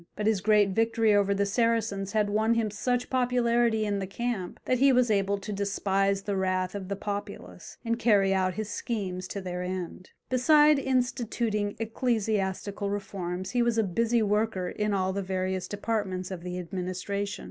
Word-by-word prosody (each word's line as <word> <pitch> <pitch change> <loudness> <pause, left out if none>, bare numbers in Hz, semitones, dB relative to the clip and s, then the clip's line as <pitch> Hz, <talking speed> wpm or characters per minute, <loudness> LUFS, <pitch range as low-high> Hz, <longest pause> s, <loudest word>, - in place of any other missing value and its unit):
But 210 - -3
his 215 -3 +2
great 210 -1 +4
victory 225 +1 +2
over 200 -1 +3
the 200 +1 +1
Saracens 215 -2 0
had 210 -2 +1
won 220 +2 +2
him 220 -2 0
such 245 +4 -1
popularity 240 -3 +2
in 205 -1 -1
the 190 - -3
camp, 210 -3 -4
that 255 - +1
he 275 +1 +6
was 250 -3 +3
able 200 0 +1
to 205 +2 -6
despise 195 0 0
the 200 -1 -2
wrath 185 -1 0
of 200 -2 -5
the 200 - -2
populace, 205 +1 -6
and 230 0 0
carry 205 -4 +4
out 185 -1 +1
his 215 0 -3
schemes 190 -5 -3
to 200 - -5
their 180 -1 -4
end. 180 0 -5 0.2
Beside 295 +3 +5
instituting 240 -5 -1
ecclesiastical 210 -3 -1
reforms 190 -2 -4
he 245 - +1
was 235 -1 +1
a 225 - +4
busy 230 +4 +1
worker 210 -3 0
in 210 0 -2
all 190 0 0
the 200 - -2
various 185 -1 -2
departments 200 -3 -3
of 185 -3 -5
the 180 0 -5
administration. 185 +3 -4
205 Hz, 175 wpm, -28 LUFS, 190-230 Hz, 0.2 s, he